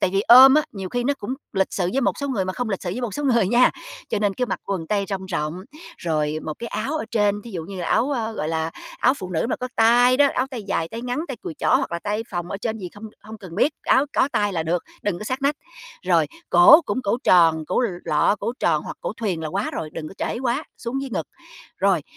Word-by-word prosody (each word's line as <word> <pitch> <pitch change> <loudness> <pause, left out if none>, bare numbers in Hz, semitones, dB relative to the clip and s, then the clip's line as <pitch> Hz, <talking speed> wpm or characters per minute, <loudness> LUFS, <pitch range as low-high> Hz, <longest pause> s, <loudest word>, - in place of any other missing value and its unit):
tại 180 - +2
vì 195 - +2
ôm 260 +3 +10
á, 305 - +5
nhiều 190 -4 -6
khi 245 +3 -2
nó 285 +2 +1
cũng 245 +6 -4 0.2
lịch 190 -2 +2
sự 180 -2 0
với 270 - +1
một 245 - +2
số 280 - -2
người 210 -8 -1
mà 185 - -3
không 245 +3 -3
lịch 195 -3 -3
sự 175 - -3
với 230 - -4
một 235 -6 -3
số 295 - -3
người 235 -7 +3
nha. 245 +3 +5 0.4
Cho - - -1
nên 205 -1 0
cứ 250 +3 -1
mặc - - -3
quần 185 -5 -3
tây 200 +2 0
rông 190 -2 -4
rộng, 155 -4 -2 0.4
rồi 155 -2 -1
một 155 - -4
cái 235 - -5
áo 270 +10 -3
ở - - -3
trên, 205 -1 +1
thí 235 - -10
dụ 175 -5 -5
như 190 +1 -7
là 175 - -3
áo, 270 +5 +2
ơ, 225 -5 -2
gọi 155 -8 -3
là, 160 0 -1 0.3
áo 255 - +3
phụ 185 -10 -8
nữ 165 +2 0
mà - - 0
có 250 - -5
tay 245 +3 +5
đó, 285 +1 +5
áo 255 - +1
tay 245 -5 -6
dài, 195 -5 -2
tay 230 - -7
ngắn, 250 +4 -2
tay 265 - -5
cùi 355 +3 -7
chỏ - - +2
hoặc - - -3
là 170 - -1
tay 210 +4 -2
phồng 175 -1 -4
ở 200 - -3
trên 220 +2 -3
gì 185 -4 -6
không 205 +2 -11 0.2
không 220 0 -9
cần 185 -4 -10
biết, 280 - +2
áo 265 - +3
có - - +2
tay 205 -1 +1
là 165 -3 -1
được, 170 +2 -1 0.2
đừng 200 -4 -1
có 210 - -7
sát 260 +4 -3
nách. 285 +2 +2 0.5
Rồi - - +3 0.2
cổ 175 - +8
cũng 255 - -2
cổ 215 0 +1
tròn, 165 -3 +5
cổ - - +1
l 250 - +2 0.2
lọ, 150 +7 +2
cổ 235 - -2
tròn - - +2
hoặc - - -7
cổ - - -3
thuyền 190 -8 -2
là 155 - -3
quá 195 +6 -2
rồi, 155 - -4
đừng 155 -1 -6
có - - -12
trễ - - -3
quá 260 +3 -1
xuống 250 +3 -3
dưới 275 - -6
ngực. - - -3 0.5
Rồi, 190 -5 +2
205 Hz, 280 wpm, -23 LUFS, 180-250 Hz, 0.5 s, ôm